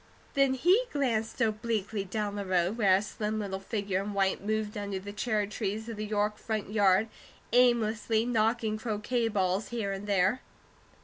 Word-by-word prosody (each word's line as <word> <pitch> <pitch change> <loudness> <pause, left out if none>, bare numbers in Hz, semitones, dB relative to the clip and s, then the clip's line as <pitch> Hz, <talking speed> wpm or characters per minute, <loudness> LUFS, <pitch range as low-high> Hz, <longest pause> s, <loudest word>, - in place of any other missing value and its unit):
Then 275 -1 +3
he 365 - +4
glanced 240 -5 -1
obliquely 215 -2 -1
down 205 +1 -3
the 205 - -3
road, 185 +1 +1
where 200 -5 +4
a 195 - +1
slim 215 0 -3
little 195 -2 -3
figure 195 -1 -2
in 205 0 -5
white 195 0 +1
moved 215 0 -1
under 200 -2 -3
the 200 +2 -7
cherry 210 -1 0
trees 210 +1 -3
of 230 - -5
the 215 0 -4
York 210 0 0
front 215 -3 -3
yard, 200 0 +4 0.5
aimlessly 230 -2 +3
knocking 225 -2 +1
croquet 225 +2 -1
balls 195 -1 0
here 225 -4 -2
and 195 +1 -5
there. 200 +4 +2
215 Hz, 170 wpm, -29 LUFS, 200-225 Hz, 0.5 s, he